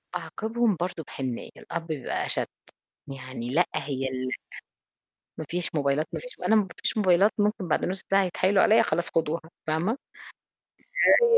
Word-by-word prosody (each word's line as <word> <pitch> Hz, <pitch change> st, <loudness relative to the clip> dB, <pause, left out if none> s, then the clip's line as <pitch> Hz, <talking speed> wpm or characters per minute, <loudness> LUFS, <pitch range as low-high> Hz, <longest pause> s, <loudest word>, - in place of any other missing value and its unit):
أعاقبهم 220 Hz, +6 st, 0 dB
برضه 175 Hz, -2 st, -2 dB
بحنيّة، 130 Hz, -3 st, -4 dB
الأب 165 Hz, -1 st, -5 dB
بيبقى 150 Hz, -6 st, -2 dB
أشد، -, -, 0 dB, 0.6 s
يعني 130 Hz, -3 st, -6 dB
لأ، 170 Hz, +6 st, +3 dB
هي 135 Hz, -2 st, -2 dB
ال 130 Hz, 0 st, -3 dB
لأ -, -, -2 dB, 1.1 s
ما 160 Hz, -, -3 dB
فيش 175 Hz, 0 st, +2 dB
موبايلات، 145 Hz, +1 st, +1 dB
ما -, -, -3 dB
فيش -, -, -11 dB
م -, -, -6 dB
أنا 220 Hz, -, +5 dB
ب -, -, +7 dB
ما 190 Hz, -, -8 dB
فيش -, -, 0 dB
موبايلات، 195 Hz, 0 st, +5 dB
ممكن 205 Hz, -3 st, +1 dB
بعد -, -, +2 dB
نُص 190 Hz, +2 st, -2 dB
ساعة 195 Hz, 0 st, +5 dB
يتحايلوا 185 Hz, +2 st, +3 dB
عليّا 220 Hz, -, +6 dB
"خلاص 170 Hz, +2 st, 0 dB
خدوها" 165 Hz, 0 st, +1 dB, 0.3 s
فاهمة؟ 160 Hz, +7 st, +1 dB, 1.1 s
آآ 475 Hz, -1 st, +7 dB
170 Hz, 170 wpm, -27 LUFS, 145-200 Hz, 1.1 s, ب